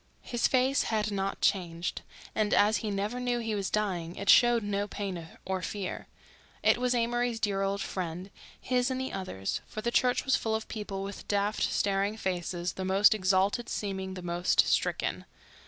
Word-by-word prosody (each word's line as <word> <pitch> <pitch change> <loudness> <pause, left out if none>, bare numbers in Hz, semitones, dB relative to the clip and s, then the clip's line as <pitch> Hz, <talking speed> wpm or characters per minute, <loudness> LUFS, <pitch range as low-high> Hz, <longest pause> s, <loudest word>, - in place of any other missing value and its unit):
His 240 -1 +1
face 260 +1 +2
had 215 -1 0
not 195 -1 -2
changed, 175 -3 0 0.3
and, 215 -1 +2
as 210 +2 +4
he 220 - -3
never 205 +4 -2
knew 245 -1 0
he 225 -2 -2
was 200 -2 -1
dying, 180 -5 -1
it 200 - +4
showed 240 -2 +6
no 205 0 -1
pain 190 -5 -5 0.2
or 190 0 -2
fear. 195 -1 -4 0.6
It - - +4
was 250 0 +1
Amory's 240 0 0
dear 200 -3 0
old 195 0 0
friend, 180 +1 -5 0.3
his 250 0 +1
and 260 0 -2
the 260 - -3
others'—for 185 - -4
the 235 - -1
church 250 0 +2
was 265 - +4
full 220 -1 0
of 220 - -4
people 200 -3 -5
with 200 0 -7
daft, 205 +1 0
staring 200 +1 +1
faces, 175 -2 -2
the 190 - -5
most 195 +3 +5
exalted 195 +4 +1
seeming 190 -2 -3
the 180 - -7
most 175 +1 +2
stricken. - - 0
205 Hz, 175 wpm, -29 LUFS, 190-225 Hz, 0.6 s, showed